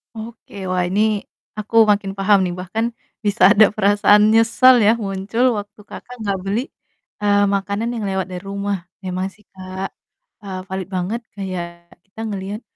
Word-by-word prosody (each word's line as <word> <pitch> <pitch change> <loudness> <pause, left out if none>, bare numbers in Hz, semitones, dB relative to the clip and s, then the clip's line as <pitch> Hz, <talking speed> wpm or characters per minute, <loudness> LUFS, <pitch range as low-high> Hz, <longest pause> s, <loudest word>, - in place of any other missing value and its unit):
Oke, 225 0 -10
wah, 185 -1 0
ini 200 +3 +1 0.6
aku 215 +2 -6 0.2
makin 200 -1 0
paham 200 +1 +4
nih. 175 - -2
Bahkan 205 +6 -2 0.4
bisa 205 +2 -1
ada 215 +1 +7
perasaan 205 +1 +4
nyesal 235 +3 +6
ya 215 - +6
muncul 200 +3 -1
waktu 205 +1 -8
Kakak 250 +4 -10
nggak 200 -1 0
beli, 205 +4 0 0.6
eee, 205 0 +3
makanan 200 +4 -2
yang 225 -3 -4
lewat 190 -1 -1
dari 180 - -5
rumah. 200 0 -3 0.3
Emang 185 +1 -2
sih 210 +1 -24
Kak, 190 0 -6 0.5
eee, 190 -2 -6
valid 190 -1 -4
banget 195 +7 -2 0.2
kayak 170 -3 -6
kita 195 +4 -17
ngeliat, 205 0 -5
200 Hz, 155 wpm, -20 LUFS, 190-215 Hz, 0.6 s, ada